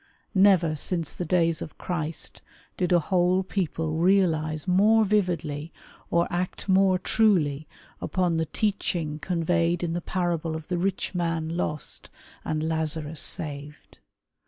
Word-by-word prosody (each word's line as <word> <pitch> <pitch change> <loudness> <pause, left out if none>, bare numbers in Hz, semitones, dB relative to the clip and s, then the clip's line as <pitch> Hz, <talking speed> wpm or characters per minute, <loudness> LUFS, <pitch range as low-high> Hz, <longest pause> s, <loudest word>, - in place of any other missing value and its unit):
Never 190 -5 +4
since 165 +1 -2
the 180 - -4
days 165 -1 +2
of 155 - -7
Christ 165 -3 -4 0.3
did 180 -1 -1
a 175 - +6
whole 180 +2 +2
people 160 -4 -2
realize 165 -4 +2
more 215 +4 +5
vividly 170 -7 -1 0.4
or 170 0 +3
act 180 +3 -3
more 190 -1 +4
truly 170 -8 +2 0.3
upon 180 -3 0
the 160 -1 0
teaching 175 -7 -1
conveyed 170 0 0
in 165 -1 -1
the 175 - -2
parable 170 -3 -1
of 160 +1 -8
the 175 -1 0
rich 190 +1 -1
man 165 -3 -1
lost 155 -4 -4 0.3
and 155 0 -1
Lazarus 160 -1 -2
saved. 145 -1 -6
170 Hz, 135 wpm, -26 LUFS, 155-185 Hz, 0.4 s, a